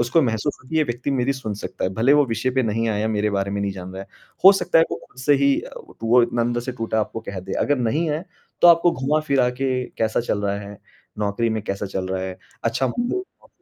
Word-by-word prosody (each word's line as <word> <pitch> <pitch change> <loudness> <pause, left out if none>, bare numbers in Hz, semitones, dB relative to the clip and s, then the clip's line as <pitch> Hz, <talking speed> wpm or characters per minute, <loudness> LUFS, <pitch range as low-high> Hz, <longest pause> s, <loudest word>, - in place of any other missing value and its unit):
उसको 120 +7 +3
महसूस 120 +3 -1
हो 130 - -18
कि 160 - -2
ये 155 - +4
व्यक्ति 120 +2 -3
मेरी 135 0 +1
सुन 115 -6 -5
सकता 105 - -5
है। 95 - 0
भले 120 +7 +3
ही - - +6
वो 145 - +5
विषय 115 +2 -1
पे 130 0 +1
नहीं 115 +1 0
आया, 110 0 0
मेरे 105 -1 0
बारे 100 -1 -1
में 100 0 -2
नहीं 100 -1 -1
जान 95 -1 -8
रहा, 95 +1 -6 0.4
हो 195 - +11
सकता 185 -4 +2
है 165 - +6
वो - - -2
खुद 130 - -22
से 145 +2 +4
ही 140 0 +3
अ, - - -10
व - - -15
टू 115 - -4
वो 120 +1 +6
इतना 120 0 0
अंदर 120 0 0
से 130 +2 -5
टूटा 115 -2 -1
आपको 115 +1 -4
कह 100 -3 -6
दे। 95 - -7
अगर 145 -2 +2
नहीं 145 +8 0
है 155 +4 -2 0.4
तो 175 - +9
आपको 170 0 +6
घुमा-फिरा 140 -1 +1
के, 130 0 -1
कैसा 110 +1 +1
चल 105 -3 -2
रहा 100 0 0
है? 100 0 -10 0.4
नौकरी 105 +3 0
में 110 -1 -2
कैसा 100 -1 -3
चल 95 -1 -3
रहा 95 0 -2
है? 95 0 -5 0.3
अच्छा 120 +3 +1
मु 245 +10 0
एक - - -9 0.2
ओ - - -20
120 Hz, 275 wpm, -22 LUFS, 105-135 Hz, 0.4 s, हो